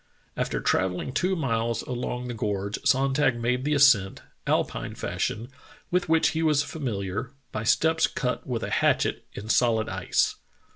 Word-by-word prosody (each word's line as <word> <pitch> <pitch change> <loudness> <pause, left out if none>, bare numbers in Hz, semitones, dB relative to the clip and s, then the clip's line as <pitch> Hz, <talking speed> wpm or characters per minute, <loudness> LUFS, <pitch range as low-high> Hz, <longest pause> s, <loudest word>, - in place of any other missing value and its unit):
After - - -1
travelling 95 +6 0
two 185 +5 +1
miles 115 - -1
along 125 0 -4
the 120 - -4
gorge 100 -2 -2
Sonntag 135 -2 +2
made 125 +2 0
the 150 0 +2
ascent, 115 -9 +4 0.2
Alpine - - -1
fashion, 115 +3 -3 0.4
with 175 -1 +1
which 160 0 +4
he 160 - -2
was 150 -3 +3
familiar, 110 - -4 0.2
by 110 - -3
steps 160 +7 +3
cut 125 -2 -3
with 120 -3 -2
a - - -4
hatchet - - +1
in 105 - -8
solid 110 -1 +2
ice." - - 0
125 Hz, 150 wpm, -26 LUFS, 110-145 Hz, 0.4 s, ascent